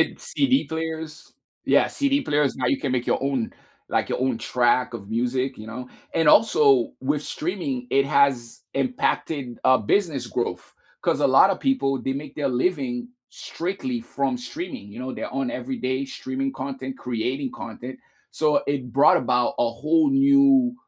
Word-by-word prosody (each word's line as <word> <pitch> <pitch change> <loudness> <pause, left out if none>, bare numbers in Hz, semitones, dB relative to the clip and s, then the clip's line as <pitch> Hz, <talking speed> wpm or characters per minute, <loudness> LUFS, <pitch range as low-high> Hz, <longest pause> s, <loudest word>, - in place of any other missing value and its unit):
And - - 0
CD 280 - +1
players. 160 -1 -5 0.3
Yeah, - - +4
CD 280 -1 +1
players, 145 - +1
now 130 -1 -1
you 135 - +1
can 130 - -1
make 125 -1 -1
your - - 0
own 135 -5 -1 0.4
like, - - 0
your - - -2
own 130 -3 0
track 120 +1 +1
of 105 -2 -8
music, 125 +3 -1
you 110 - -9
know? 125 +3 -7 0.3
And 165 -2 +2
also, 140 - +5
with 145 +2 -1
streaming, 150 -8 -3
it 135 0 +3
has 130 -5 +1
impacted, 145 - -1
uh, 130 - +5
business 140 - 0
growth 115 -7 -4 0.3
'cause - - +1
a - - +4
lotta 160 +9 +5
people, 200 - 0
they 135 - -2
make 140 0 -7
their 145 -2 -1
living 240 - -1 0.2
strictly 165 -9 -4
from 130 +2 -2
streaming, 120 - -7
you 110 - -10
know, 130 +1 -5
their - - -5
own 135 -2 -1
everyday-streaming 130 +1 -3
content, 130 0 -5
creating 125 +3 -3
content, 125 +3 -8 0.3
so, 155 -1 +2
it 135 -4 -2
brought 140 +5 +5
about 125 -1 +1
a 120 - +3
whole 310 - +2
new 275 -2 +5
135 Hz, 160 wpm, -24 LUFS, 125-160 Hz, 0.4 s, also